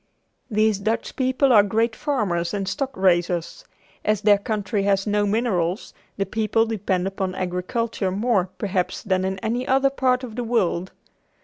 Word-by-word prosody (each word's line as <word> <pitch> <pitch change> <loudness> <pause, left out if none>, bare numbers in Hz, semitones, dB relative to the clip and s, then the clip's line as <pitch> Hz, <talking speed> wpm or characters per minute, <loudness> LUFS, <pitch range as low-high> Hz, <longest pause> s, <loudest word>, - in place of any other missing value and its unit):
These 215 -2 +2
Dutch 220 +3 -2
people 260 0 +2
are 210 - +8
great 225 +3 0
farmers 210 - -1
and 195 -1 -3
stock 260 +8 -2
raisers. 175 - +1 0.4
As 210 -1 +1
their 205 -1 +5
country 205 0 -2
has 195 -1 +1
no 205 -1 +1
minerals, 200 -4 -1 0.2
the 195 - 0
people 225 +1 +1
depend 195 -5 -1
upon 190 -1 -3
agriculture 190 +4 -2
more 200 -1 +1
perhaps 185 -3 -2
than 185 -3 0
in 190 0 -2
any 240 +3 -1
other 270 +1 +3
part 255 -1 +1
of 230 -4 -7
the 245 - -2
world. 190 -6 0
205 Hz, 155 wpm, -23 LUFS, 190-230 Hz, 0.4 s, are